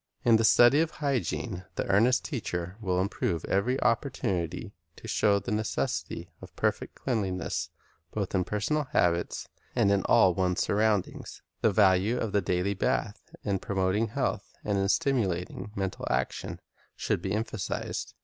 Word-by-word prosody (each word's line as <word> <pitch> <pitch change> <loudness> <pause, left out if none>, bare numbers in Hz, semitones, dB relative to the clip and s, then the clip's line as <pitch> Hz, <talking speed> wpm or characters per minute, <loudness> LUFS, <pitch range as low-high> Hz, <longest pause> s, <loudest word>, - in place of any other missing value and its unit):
In 115 -2 +6
the 115 - +1
study 120 +6 +6
of 165 - +1
hygiene 125 - -2
the - - -1
earnest 115 +6 +3
teacher 90 - -3
will 90 -3 0
improve 95 -3 -1
every 120 +8 +1
opportunity 95 - -1 0.2
to - - -11
show 100 -1 +3
the 100 - -4
necessity 105 0 -2
of - - -12
perfect - - -1
cleanliness 95 -9 -2 0.4
both 100 -3 -3
in 95 -2 +2
personal 125 +11 -1
habits 85 0 +1 0.3
and 100 - +3
in 100 -1 +3
all 95 - +5
one's 90 0 0
surroundings. 105 -2 0 0.2
The 110 - +4
value 100 +3 +4
of 115 -4 -2
the 100 0 +2
daily 90 +1 0
bath 105 +2 -1 0.2
in 100 -2 0
promoting 95 +3 0
health 105 - -3
and 105 - 0
in 95 0 +1
stimulating 105 - 0
mental 95 -1 -3
action, 65 0 -2 0.3
should - - -1
be 95 +1 -2
emphasized. 110 -2 -3
100 Hz, 150 wpm, -28 LUFS, 95-115 Hz, 0.4 s, In